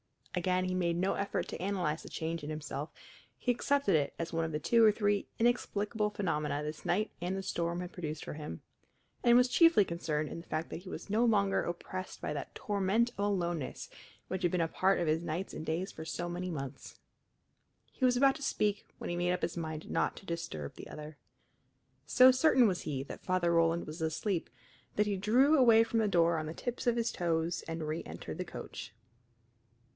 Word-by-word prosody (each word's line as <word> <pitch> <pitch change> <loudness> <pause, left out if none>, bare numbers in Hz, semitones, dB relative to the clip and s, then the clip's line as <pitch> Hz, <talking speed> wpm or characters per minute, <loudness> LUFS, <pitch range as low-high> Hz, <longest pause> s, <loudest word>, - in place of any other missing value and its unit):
Again 185 0 +1
he 185 - -1
made 175 -2 +1
no 185 +3 +1
effort 200 0 -2
to - - -6
analyze 180 -5 -1
the - - -10
change 165 +1 -3
in 145 - -5
himself; 150 -1 -4 0.5
he 250 - +1
accepted 280 -1 +2
it 145 -2 +1
as 165 0 -4
one 165 0 +1
of 160 - -4
the 150 0 -2
two 230 +8 +4
or 215 - +8
three 205 -1 0
inexplicable 220 -2 +1
phenomena 150 -7 -1
this 150 +1 -6
night 205 +5 +1
and 180 +2 -1
the 195 - -4
storm 170 -1 -2
had 180 0 -6
produced 155 -3 -5
for - - -5
him, 150 - -7 0.6
and 240 0 +7
was 250 0 +5
chiefly 330 - +6
concerned 155 -3 -2
in - - -6
the 165 - -13
fact 155 +1 -2
that - - -5
he 180 +2 -10
was - - -7
no 220 +4 +3
longer 200 -4 +3
oppressed 185 +2 -5
by - - -3
that 145 - -6
torment 205 +4 +1
of - - -21
aloneness 175 -7 -2 0.4
which 190 0 -3
had 175 -2 +2
been 180 - +1
a 165 - +1
part 190 +3 +2
of 175 - +1
his 155 +1 +1
nights 170 +3 -3
and 155 - -6
days 170 +4 -1
for 160 - -8
so 175 +2 -3
many 180 +1 -3
months. 135 -4 -6 0.9
He 260 - 0
was 250 -1 +4
about 270 +1 +5
to 310 - -9
speak 210 -6 0
when - - -5
he 175 - -2
made 175 0 +1
up 180 - -3
his 170 +1 -1
mind 160 -1 -5
not - - +1
to - - -12
disturb 80 - -5
the - - -9
other. 150 0 -9 0.9
So 255 +1 +8
certain 255 -2 +5
was 185 -3 -1
he 135 -3 -3
that - - -10
Father 180 -2 +2
Roland 165 0 +3
was 155 +2 -7
asleep 165 +3 -1 0.5
that 210 - +3
he 200 -1 0
drew 255 +10 +4
away 230 -4 +7
from 230 0 0
the 220 - +2
door 170 -3 +3
on 155 - -4
the 160 - -6
tips 245 0 -4
of 240 - +4
his 235 0 0
toes 170 -1 -1
and 165 0 -4
reëntered 155 +1 -5
the - - -3
coach. - - -8
180 Hz, 210 wpm, -32 LUFS, 160-210 Hz, 0.9 s, or